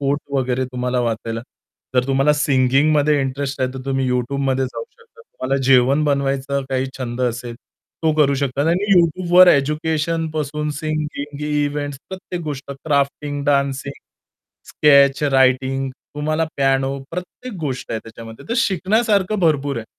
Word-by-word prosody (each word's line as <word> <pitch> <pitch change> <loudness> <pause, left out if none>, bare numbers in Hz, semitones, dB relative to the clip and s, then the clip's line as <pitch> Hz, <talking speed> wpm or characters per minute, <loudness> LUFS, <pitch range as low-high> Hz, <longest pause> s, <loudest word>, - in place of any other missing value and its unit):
Coat 140 +1 0
वगैरे 130 -1 0
तुम्हाला 125 0 -1
वाचायला. 115 -1 -2 0.5
जर 125 0 +3
तुम्हाला 135 +2 +3
सिंगिंगमध्ये 145 +1 +2
इंटरेस्ट 135 +1 -3
आहे, 130 - +1
तर 130 - -6
तुम्ही 135 -1 0
YouTubeमध्ये 130 +1 0
जाऊ 295 - -6
शकता. 465 -1 -22
तुम्हाला 135 - -3
जेवण 135 +3 +4
बनवायचा 140 -1 0
काही 130 0 0
छंद 125 -1 -4
असेल 120 -1 -2 0.5
तो 160 - +4
करू 145 -2 +3
शकता 140 0 -1
आणि 195 +4 +1
YouTubeवर 175 +1 +5
एज्युकेशन 160 +3 +1
पासून 150 0 -3
सिंगिंग, 150 -2 -4
इव्हेंट्स 145 -1 -2
प्रत्येक 185 -2 -6
गोष्ट 140 -2 -6
क्राफ्टिंग, 145 0 -1
डान्सिंग, 140 -1 0 0.7
स्केच, 140 -1 +4
रायटिंग, 135 -1 +2 0.3
तुम्हाला 155 +2 0
पियानो 135 0 +1
प्रत्येक 180 +7 -7
गोष्ट 135 -4 -4
आहे 110 - -1
त्याच्यामध्ये. 115 0 -12
तर 235 - -1
शिकण्यासारखं 210 -1 +1
भरपूर 145 -5 +1
आहे. 115 - -4
140 Hz, 135 wpm, -20 LUFS, 130-155 Hz, 0.7 s, YouTubeवर